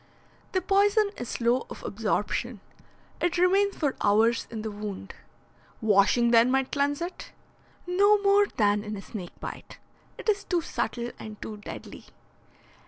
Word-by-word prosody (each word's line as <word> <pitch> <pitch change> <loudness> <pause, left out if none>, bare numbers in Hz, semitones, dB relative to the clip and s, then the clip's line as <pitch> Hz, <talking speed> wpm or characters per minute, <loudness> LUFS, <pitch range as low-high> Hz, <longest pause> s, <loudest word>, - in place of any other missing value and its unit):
"The 375 - +1
poison 405 +2 +3
is 245 - -6
slow 240 +2 0
of - - -9
absorption. 215 +2 -2 0.6
It 350 0 0
remains 390 +3 +3
for 290 -4 -1
hours 220 +3 +3
in 220 -2 -6
the 220 - -3
wound." 205 -2 -6 0.7
"Washing, 220 +3 +4
then, 235 +1 +6
might 265 0 +1
cleanse 285 +2 0
it?" 350 - -7 0.5
"No 400 +4 +4
more 405 +1 +5
than 205 - +1
in 210 -1 -5
a - - -7
snake 185 -6 -8
bite. - - -8 0.4
It - - -9
is 410 -2 +2
too 350 -2 0
subtle 240 -4 -3
and 215 -1 -9
too 215 - -7
deadly." 205 - -9
245 Hz, 150 wpm, -27 LUFS, -, 0.7 s, then